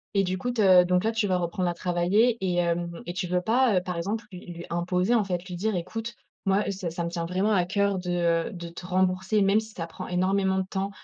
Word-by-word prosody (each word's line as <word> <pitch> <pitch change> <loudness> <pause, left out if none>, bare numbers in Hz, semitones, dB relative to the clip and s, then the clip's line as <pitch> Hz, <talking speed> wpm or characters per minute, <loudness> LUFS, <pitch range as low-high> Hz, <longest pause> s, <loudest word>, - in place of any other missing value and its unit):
Et 195 - +4
du 185 0 -1
coup 245 - -2
te 190 -6 +6
donc 180 +1 +2
là, 225 - +1
tu 220 -2 0
vas 185 -1 +2
reprendre 180 +1 -1
à 175 - -1
travailler 180 +7 +2
et 185 -2 0
hem, 170 0 -1
et 175 - -4
tu 180 0 -3
veux 180 0 0
pas, 230 +3 +3
heu, - - +2
par 180 -1 -4
exemple, 210 +6 -3
lui 180 -1 -10
lui 170 0 -8
imposer, 180 +5 +1
en 225 -3 +3
fait, 180 -1 -3
lui 180 - -6
dire: 210 +4 -1
«Écoute, 220 +6 -4 0.3
moi, 195 +2 +3
est - - -1
ce 190 -2 -5
te - - -3
ça 170 0 -3
me 170 - -2
tient 170 -1 -3
vraiment 190 +4 0
à 185 -3 +3
coeur 200 +1 0
de, 170 -2 +1
heu, - - -10
de 170 -4 -7
te 170 +2 -10
rembourser, 185 +2 +1
même 200 +2 +4
si 220 0 -8
ça 165 - -4
prend - - -8
énormément 190 +1 +1
de 190 - 0
temps, 195 +1 -2
185 Hz, 270 wpm, -26 LUFS, 175-200 Hz, 0.3 s, te